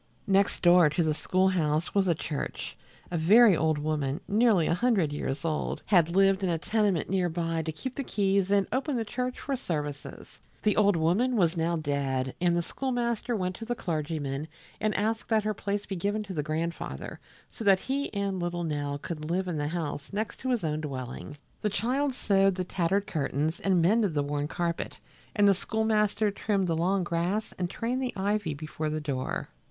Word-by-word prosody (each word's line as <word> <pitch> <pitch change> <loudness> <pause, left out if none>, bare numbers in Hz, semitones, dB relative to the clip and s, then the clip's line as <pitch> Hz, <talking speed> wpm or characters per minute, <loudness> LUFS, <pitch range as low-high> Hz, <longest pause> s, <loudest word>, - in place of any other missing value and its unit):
Next 195 -2 +2
door 175 -2 +7
to 160 +3 +1
the 155 -1 +1
school 185 +5 +2
house 160 -3 0
was 195 -2 +2
the 170 - +3
church. 150 -1 -4 0.4
A 170 - 0
very 205 +5 +7
old 155 -1 +1
woman, 150 -1 -1
nearly 210 -5 +4
a - - +2
hundred 185 -6 +2
years 145 0 -3
old, 155 -2 -2
had 170 -3 +3
lived 195 0 +4
in 190 - 0
a 170 - +1
tenement 205 -1 +1
near 185 -2 +1
by 165 -1 -1
to 160 0 -3
keep 255 - -6
the 275 - -3
keys 195 -4 +1
and 200 -1 +3
open 270 +1 0
the 225 - -1
church 250 +4 -3
for 275 - -2
services. 150 - -5 0.2
The 210 -2 +3
old 205 -2 +4
woman 185 +11 +2
was 175 -3 +3
now 170 +1 0
dead, 135 -4 -1
and 175 -1 +3
the 170 - +1
schoolmaster 240 +1 -1
went 185 -3 -2
to 225 - -7
the 240 +1 -2
clergyman 155 - -3 0.3
and 215 -1 0
asked 220 +2 -1
that 220 -2 +3
her 215 0 0
place 205 +1 -3
be 195 - -4
given 205 +4 -1
to 200 -2 -7
the 155 - -1
grandfather, 155 - -4 0.3
so - - -7
that 195 -2 +5
he 280 +2 -2
and 200 -2 -2
little 175 0 -2
Nell 145 -3 -2
could 155 0 -6
live 185 +2 0
in 165 -4 -2
the 145 - -1
house 155 -3 -4
next 210 +2 -3
to 260 - -3
his 245 -6 +1
own 155 -1 -1
dwelling. 135 0 -6 0.2
The 210 - +1
child 255 +6 0
sewed 195 -4 +3
the 185 - -1
tattered 190 +3 0
curtains 155 0 -1
and 185 -4 +2
mended 205 -2 +3
the 145 - +2
worn 145 0 -2
carpet 170 +1 -3 0.4
and 205 -2 +5
the 200 - +7
schoolmaster 215 +1 +1
trimmed 200 -1 0
the 165 -2 0
long 185 +3 +1
grass 175 +5 -1
and 180 -1 -1
trained 245 +6 -2
the 255 - -2
ivy 200 -5 -1
before 155 +1 -4
the 155 0 -2
door. 140 -4 -3
180 Hz, 200 wpm, -28 LUFS, 155-210 Hz, 0.4 s, door